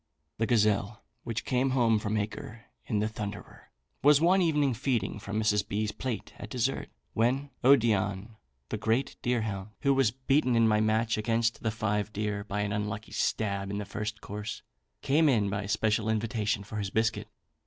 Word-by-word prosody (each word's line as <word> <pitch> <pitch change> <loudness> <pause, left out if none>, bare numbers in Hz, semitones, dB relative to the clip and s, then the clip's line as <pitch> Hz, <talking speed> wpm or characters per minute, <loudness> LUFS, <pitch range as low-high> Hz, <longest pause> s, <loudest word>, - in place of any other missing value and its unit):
"The 115 - +1
gazelle 105 -2 +1 0.2
which 115 -2 -4
came 130 +1 +1
home 115 -3 +4
from 105 +1 -1
Acre 110 +2 -5 0.2
in 105 - 0
the 105 +1 +1
Thunderer, 105 -2 -7 0.3
was 145 0 +7
one 180 +4 +4
evening 150 -6 +2
feeding 115 -5 -1
from 105 +1 -3
Mrs. 105 -2 +1
B.'s 105 +1 -1
plate 120 -5 -5
at - - -7
dessert, - - -1 0.2
when 130 +5 +1
Odion, 110 -5 +3 0.3
the - - -2
great 115 +5 0
deerhound, 110 -5 -1
who 140 -1 +3
was 135 -4 +3
beaten 130 +1 +1
in 115 -1 +5
my 105 -1 +3
match 110 0 +1
against 115 +1 0
the 110 - 0
five 105 -1 -1
deer 105 -1 -2
by 105 0 -3
an 105 0 -1
unlucky 105 +1 -3
stab 100 -2 -1
in 100 - -3
the 105 - -3
first 105 +2 -5
course, 105 +2 -6 0.4
came 150 +3 +4
in 105 -6 +2
by 100 0 -2
special 110 +1 +1
invitation 110 -2 0
for 105 +2 -7
his 100 -2 -2
biscuit. 110 +2 0
110 Hz, 175 wpm, -29 LUFS, 105-120 Hz, 0.4 s, was